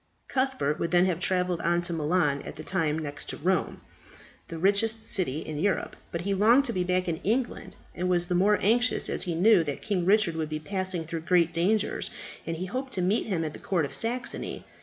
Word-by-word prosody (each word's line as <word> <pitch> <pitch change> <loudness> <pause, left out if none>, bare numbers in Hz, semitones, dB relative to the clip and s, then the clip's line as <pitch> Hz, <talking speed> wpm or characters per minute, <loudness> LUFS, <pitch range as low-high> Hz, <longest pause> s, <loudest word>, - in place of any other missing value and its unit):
Cuthbert 260 - -1
would 170 - -1
then 175 +1 +4
have 180 -3 0
travelled 180 -2 0
on 175 +1 +1
to 175 - +1
Milan 150 -3 +1
at - - -8
that 155 - -9
time 160 -5 0
next 145 -2 -6
to - - -4
Rome 180 +3 -1 0.7
the 165 - -7
richest 205 +5 +2
city 165 -9 +1
in 150 -2 -6
Europe, 200 +3 -1 0.2
but 170 - -3
he 200 +2 -1
longed 230 +8 +4
to 235 - 0
be 185 - 0
back 180 0 0
in 165 -2 -1
England, 235 +8 -2 0.2
and 180 +1 -2
was 175 -1 +3
the 180 - -2
more 200 +4 +4
anxious 240 +5 +2
as - - +1
he 175 -3 -2
knew 190 +1 +5
that 145 -3 -5
King 200 -5 0
Richard 195 -2 +3
would 160 -1 -3
be 155 - -2
passing 185 +1 -3
through 160 0 -5
great 170 0 +2
dangers, 195 +6 0 0.4
and 165 0 -3
he 180 - -4
hoped 255 +6 -4
to 185 - 0
meet 200 +6 +1
him 180 -6 -1
at 155 - -4
the - - -9
Court 175 -6 0
of 140 - -8
Saxony. 240 - -1
180 Hz, 225 wpm, -27 LUFS, 165-205 Hz, 0.7 s, knew